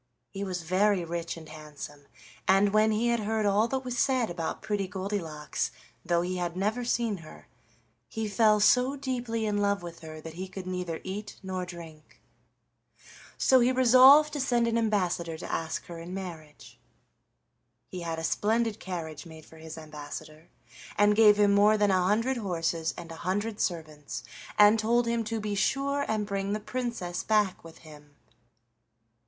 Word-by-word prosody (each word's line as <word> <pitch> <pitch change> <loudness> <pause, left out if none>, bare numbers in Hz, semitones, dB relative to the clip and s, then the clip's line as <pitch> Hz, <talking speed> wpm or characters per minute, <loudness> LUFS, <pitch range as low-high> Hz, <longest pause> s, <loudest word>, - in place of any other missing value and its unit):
He 195 0 -5
was 185 -3 -4
very 185 +2 +2
rich 170 0 -4
and 160 -1 -11
handsome, 150 -2 -10 0.4
and 195 +1 +4
when 215 +1 +4
he 235 +2 +2
heard 220 -1 -1
all 205 +3 +3
that 265 +2 -2
was 245 -1 -3
said 255 -7 +2
about 170 +2 -4
Pretty 205 -3 -1
Goldilocks, 180 -5 -3 0.3
though 170 0 +1
he 180 +1 -3
had 175 0 -3
never 215 +6 -1
seen 235 -3 0
her, 165 -3 -13 0.6
he 220 -1 -3
fell 210 +1 +4
so 250 +6 +4
deeply 245 -5 -3
in 205 -1 0
love 200 -2 +1
with 170 -1 -8
her 155 -1 -9
that 160 +1 -9
he 185 +3 -6
could 185 0 -8
neither 180 -3 -4
eat 205 +3 -6
nor 185 -1 -4
drink. 165 -3 -11 1.2
So 260 - +5
he 245 +1 +4
resolved 260 +4 +7
to 295 - -3
send 240 -3 +2
an 230 - 0
ambassador 180 -7 0
to - - -7
ask 160 -1 -3
her 170 -1 -8
in 175 +3 -7
marriage. 155 - -9 1.1
He 185 - -7
had 165 -1 -3
a 160 - -5
splendid 220 +5 0
carriage 165 -4 -6
made 160 -1 -12
for 160 - -16
his 160 0 -9
ambassador, 155 +1 -9 0.5
and 205 0 +4
gave 210 -1 +6
him 205 -1 +4
more 210 +2 +5
than 205 -1 +3
a 185 -1 +3
hundred 230 +6 +1
horses 165 -5 -1
and 170 -1 -8
a 165 - -8
hundred 205 +4 -2
servants, 155 -7 -4 0.3
and 210 +1 +7
told 235 +2 +2
him 235 0 0
to 225 +1 -2
be 210 -1 -3
sure 275 +7 0
and 215 -1 -1
bring 200 0 -2
the 210 - -1
Princess 230 -6 -4
back 210 -3 +1
with 165 -1 -13
him. 150 -2 -15
195 Hz, 170 wpm, -28 LUFS, 165-220 Hz, 1.2 s, resolved